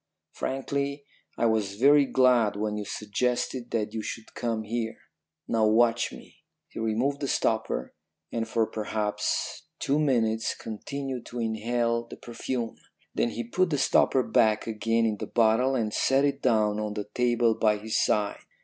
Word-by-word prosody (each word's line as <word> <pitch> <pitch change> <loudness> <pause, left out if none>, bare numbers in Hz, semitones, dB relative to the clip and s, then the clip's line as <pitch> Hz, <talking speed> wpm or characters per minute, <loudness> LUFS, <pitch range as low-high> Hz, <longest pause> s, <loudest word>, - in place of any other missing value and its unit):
Frankly, 140 +1 -3 0.3
I 115 - +1
was 110 -3 +1
very 140 +5 +6
glad 125 -5 +3
when 105 +1 -2
you 105 -1 -4
suggested 120 +4 -2
that 105 -2 -2
you 110 - -2
should 110 +1 -7
come 115 -2 -2
here. 115 +1 -3 0.5
Now, 110 -1 +2
watch 115 +2 +3
me.' - - -13 0.3
"He - - -8
removed 115 +6 0
the 140 - -2
stopper, - - -1 0.4
and 115 -1 -2
for 115 0 +1
perhaps 105 -1 -2
two 140 +2 +1
minutes 115 -6 +1
continued 130 +3 -5
to 120 - -6
inhale 115 +1 0
the - - -10
perfume. 120 0 -4 0.4
Then 120 - +1
he 120 +1 -4
put 175 +10 +1
the 150 - 0
stopper 130 -1 +3
back 110 -3 +2
again 115 +1 0
in 110 -2 0
the - - -4
bottle 120 +4 +3
and 110 -4 -1
set 135 +1 +3
it 140 -1 -1
down 105 -2 +2
on 105 -1 -3
the 105 -1 -4
table 120 -2 +2
by 105 -1 +2
his 110 +1 0
side. 105 -1 0
115 Hz, 160 wpm, -27 LUFS, 110-125 Hz, 0.5 s, very